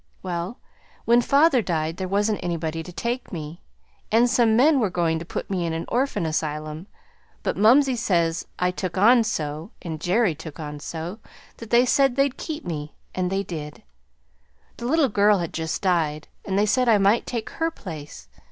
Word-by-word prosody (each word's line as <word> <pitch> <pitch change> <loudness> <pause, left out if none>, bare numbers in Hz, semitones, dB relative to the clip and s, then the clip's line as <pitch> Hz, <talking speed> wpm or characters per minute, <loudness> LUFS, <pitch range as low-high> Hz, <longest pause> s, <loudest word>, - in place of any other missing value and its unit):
Well, 180 +5 -4 0.5
when 235 +1 +5
father 280 0 +4
died 165 -3 -2
there 185 - -3
wasn't 205 +2 +1
anybody 165 -2 -2
to 180 - -9
take 240 +7 -3
me, 160 0 -7 0.5
and 230 +3 +5
some 235 -2 +3
men 280 +4 +5
were 215 -5 +1
goin' 170 -2 0
to 170 - -7
put - - -5
me 185 -3 -2
in 165 -1 -2
an 165 +1 -3
orphan 245 -7 0
asylum; 155 +1 -3 0.6
but - - -1
mumsey 255 +5 +5
says 170 -7 0
I 180 0 +1
took 180 0 -4
on 230 +5 +6
so, 155 -4 -3
and 160 -3 -6
Jerry 190 +1 +2
took 155 0 -10
on 150 -1 -6
so, 165 +7 -6 0.4
that 230 - -10
they 240 +2 +5
said 270 0 +3
they'd 275 -1 +2
keep 315 -1 -5
me. 150 -3 -5 0.2
And 185 -1 -1
they 195 +1 0
did. 155 0 -7 0.9
The 240 - -4
little 310 +1 +3
girl 205 -2 +4
had 170 -3 -4
just 160 +3 -3
died, 160 -5 0 0.2
and 195 0 -1
they 205 - +4
said 250 +3 +2
I 220 - +6
might 200 +3 +3
take 235 -3 -4
her 325 0 -1
place. 160 - -9
185 Hz, 185 wpm, -24 LUFS, 165-235 Hz, 0.9 s, on